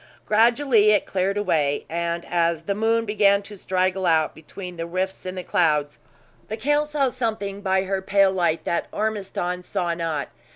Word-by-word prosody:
Gradually 230 0 +4
it 210 - +2
cleared 195 +1 -1
away; 155 -8 0
and 170 +1 -2
as 170 -2 0
the 200 - -1
moon 225 +2 +1
began 205 -1 +3
to 205 +1 -9
straggle 185 0 0
out 160 -1 +2
between 180 +3 -9
the 165 0 -5
rifts 185 +2 -3
in 185 - -4
the 185 - -5
clouds, 150 -5 +1 0.5
the 220 - -4
count 295 +5 +1
saw 290 -3 +1
something 220 -5 -3
by 190 -1 +1
her 195 0 -2
pale 195 0 +3
light 175 -3 0
that 170 - -1
Ormiston 195 -4 -2
saw 175 -1 -2
not. 165 -5 -3
190 Hz, 170 wpm, -23 LUFS, 170-210 Hz, 0.5 s, Gradually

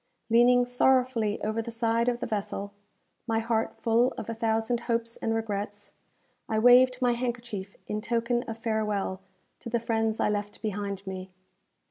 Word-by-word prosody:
Leaning 245 +1 +6
sorrowfully 245 -3 +2
over 220 +1 0
the 230 - -6
side 230 +1 +1
of 240 - -1
the - - -4
vessel, 200 -2 -3 0.5
my 225 -1 +1
heart 225 0 -1
full 235 +2 +2
of 225 - -5
a - - -2
thousand 225 +1 0
hopes 230 0 0
and 225 0 -1
regrets, 205 -2 -4 0.6
I 220 - 0
waved 250 +2 +6
my 245 - +4
handkerchief 235 -5 -4
in 210 0 -3
token 235 +1 0
of 225 - -5
farewell 210 -4 -1 0.4
to - - -7
the 235 0 +1
friends 225 -1 0
I - - +2
left 205 0 -3
behind 200 -2 -3
me. 190 0 -6
225 Hz, 160 wpm, -28 LUFS, 210-235 Hz, 0.6 s, Leaning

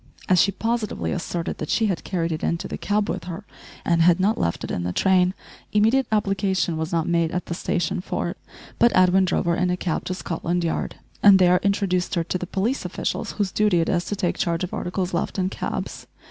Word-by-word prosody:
As 185 -3 +5
she 200 - +3
positively 225 +2 -2
asserted 170 0 -3
that - - -4
she 225 - +2
had 190 -5 -1
carried 170 -3 -2
it 155 - -3
into 170 - -1
the - - -5
cab 205 +1 0
with - - -3
her 180 +3 -7 0.4
and 170 -1 +3
had 175 +1 +5
not 205 +4 +2
left 85 - -1
it - - -4
in - - -2
the 90 +1 -2
train, 185 - +3 0.4
immediate 225 +5 +3
application 195 -4 +1
was 160 0 -3
not 165 -1 0
made 170 -1 +2
at 180 +2 -3
the - - -4
station 175 +2 -1
for - - -2
it, - - -7 0.4
but 235 - +5
Edwin 185 +1 +5
drove 180 - 0
her 170 0 +2
in 180 +1 +1
a 180 - 0
cab 175 -3 -2
to 185 - -2
Scotland 175 0 -2
Yard, 165 - -2 0.3
and 200 -1 +8
there 180 -1 +5
introduced 195 -3 0
her 170 - +1
to 180 +2 -3
the 180 - -5
police 215 +9 -1
officials - - -3
whose 200 -3 -1
duty 210 -4 +2
it 165 - 0
is 175 -1 +1
to 205 - -3
take 185 -3 -1
charge 170 +1 0
of 180 - -4
articles 180 0 -2
left 170 - -2
in 185 -1 +1
cabs. - - -5
180 Hz, 230 wpm, -23 LUFS, 170-200 Hz, 0.4 s, and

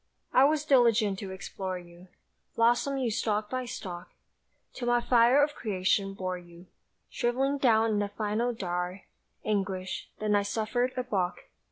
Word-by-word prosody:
I 260 - +7
was 300 0 +1
diligent 230 -8 +4
to 195 - -6
explore 190 0 -5
you, 175 +1 -14 0.5
Blossom 240 +4 +2
you 250 -4 0
stalk 215 -2 -1
by 255 -1 -2
stalk, 180 -7 -7 0.6
Till 245 - -5
my 240 0 +4
fire 240 +3 +5
of 295 0 0
creation 195 -2 0
bore 185 -1 -3
you 175 0 -15 0.5
Shrivelling 270 +3 0
down 225 -3 +4
in 210 - +1
the 205 -1 -1
final 215 +3 -1
dour 180 -3 -3 0.4
Anguish 190 -3 -2
then 215 -1 0
I 205 - +4
suffered 225 +5 -1
a 255 - 0
balk. 190 -7 -2
215 Hz, 155 wpm, -29 LUFS, 190-245 Hz, 0.6 s, I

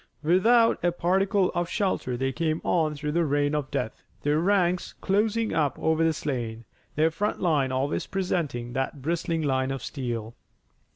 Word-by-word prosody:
Without 225 +9 +4
a 175 - +3
particle 190 +3 +1
of 175 -1 -1
shelter 185 - -1
they 135 +1 0
came 160 +2 -1
on 155 -3 +1
through 150 +1 -3
the 170 +2 +2
rain 145 -1 +1
of 145 -3 -1
death, 110 - -3 0.2
their 145 +1 +2
ranks 180 -1 +1
closing 215 +3 +1
up 150 -3 +1
over 160 0 +1
the 165 - +4
slain, 120 -7 -4 0.3
their 160 +2 +3
front 205 +6 -2
line 145 -7 +1
always 135 +3 -1
presenting 160 -11 -2
that 135 +1 -3
bristling 165 +1 -1
line 130 -2 +1
of 135 -2 -4
steel. 120 -5 -4
155 Hz, 165 wpm, -26 LUFS, 135-180 Hz, 0.3 s, Without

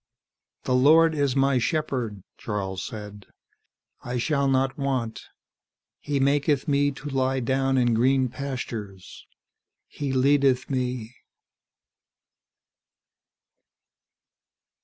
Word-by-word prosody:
"The 130 - -1
Lord 160 +5 +5
is 140 -3 0
my 135 -1 +3
shepherd," 125 - -2
Charles 95 -3 -4
said. 105 -2 -8 0.8
"I 125 0 -3
shall 140 +2 +1
not 135 0 +1
want. 130 -5 -3 0.7
He 145 -1 -2
maketh 140 0 +1
me 145 -1 +2
to 145 - -9
lie 135 -1 0
down 135 +2 0
in 120 -2 +3
green 130 +3 +3
pastures; 115 -8 -7 0.6
he 140 -2 -5
leadeth 135 0 +2
me 125 -2 -3
130 Hz, 95 wpm, -25 LUFS, 120-140 Hz, 0.8 s, Lord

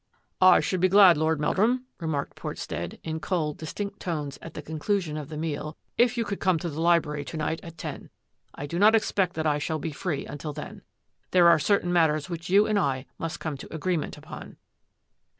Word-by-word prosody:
" - - -47 0.2
I - - +2
should 185 - -1
be 185 +1 +3
glad. 190 -2 +8
Lord 155 0 +1
Meldrum," 230 +11 +1
remarked 160 -4 -3
Portstead, - - -5
in 160 0 -3
cold, 155 -3 -2
distinct 200 +5 -5
tones 150 -6 -4
at 165 - -10
the 150 - -6
conclu 160 +7 -1
sion 160 -5 -5
of 150 -2 -6
the 155 - -6
meal, 155 -1 -4
" - - -46
if 240 0 +3
you 230 - 0
would 200 - -3
come 185 -3 +2
to 170 +2 -4
the 155 +1 -5
li 170 0 +5
brary 150 -2 -5
to 165 - -5
night 155 +1 -1
at 165 -1 -11
ten. - - -7 0.5
I 145 - -5
do 170 +4 -3
not 215 +3 +6
expect 195 -4 +1
that 160 0 -2
I 150 -1 +2
shall 155 +2 -2
be 160 +1 -4
free 150 0 -3
until 145 +1 -6
then. 195 +7 -8 0.5
There 180 -2 +5
are 170 -2 +6
certain 175 +3 +1
mat 165 -2 +5
ters 150 +2 -3
which 170 0 -5
you 200 +3 +5
and 215 -1 +1
I 135 -5 -1
must 165 0 -4
come 155 -3 -4
to - - -11
agreement 165 0 -2
upon." - - -10
160 Hz, 225 wpm, -26 LUFS, 150-185 Hz, 0.5 s, glad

